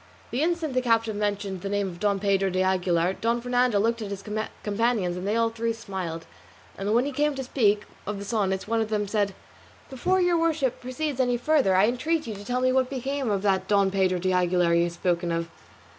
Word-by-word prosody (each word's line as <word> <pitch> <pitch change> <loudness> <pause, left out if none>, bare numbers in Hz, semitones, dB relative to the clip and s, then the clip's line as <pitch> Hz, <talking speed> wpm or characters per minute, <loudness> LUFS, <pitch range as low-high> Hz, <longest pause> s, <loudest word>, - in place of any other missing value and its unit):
The 250 - -1
instant 330 -3 0
the 255 - +2
captive 225 -3 +1
mentioned 205 -2 -2
the 195 - -4
name 205 -1 0
of 175 -2 -8
Don 200 -1 +1
Pedro 195 -1 +2
de 185 0 +1
Aguilar, 180 -1 +1
Don 235 +1 +1
Fernando 245 -2 +2
looked 230 +2 +1
at 210 - -4
his 200 -1 -6 0.4
companions 210 -4 0
and 180 +2 -4
they 210 - +1
all 230 0 +2
three 230 0 -1
smiled; 190 -7 -5 0.5
and 200 +1 -2
when 245 +3 +3
he 285 - -2
came 295 +1 0
to 265 - -3
speak 210 -5 +2 0.2
of 210 0 -3
the 200 - -6
sonnets 195 -3 -1
one 225 +1 +1
of 220 - -2
them 210 -1 -1
said, 200 -2 0 0.6
"Before 365 +9 +1
your 355 -2 +3
worship 320 -6 0
proceeds 265 +2 -3
any 245 -1 +2
further 255 -6 +2
I 190 +2 +5
entreat 305 +7 0
you 225 - -4
to 200 0 -9
tell 250 +4 -1
me 255 0 +3
what 260 -1 +2
became 270 -1 -2
of 200 -1 0
that 190 -2 +1
Don 200 -2 +3
Pedro 190 -2 +2
de 185 +1 0
Aguilar 180 -1 +2
you 170 0 +4
have 170 - -4
spoken 175 0 -1
of." 165 0 -2
210 Hz, 225 wpm, -26 LUFS, 190-250 Hz, 0.6 s, I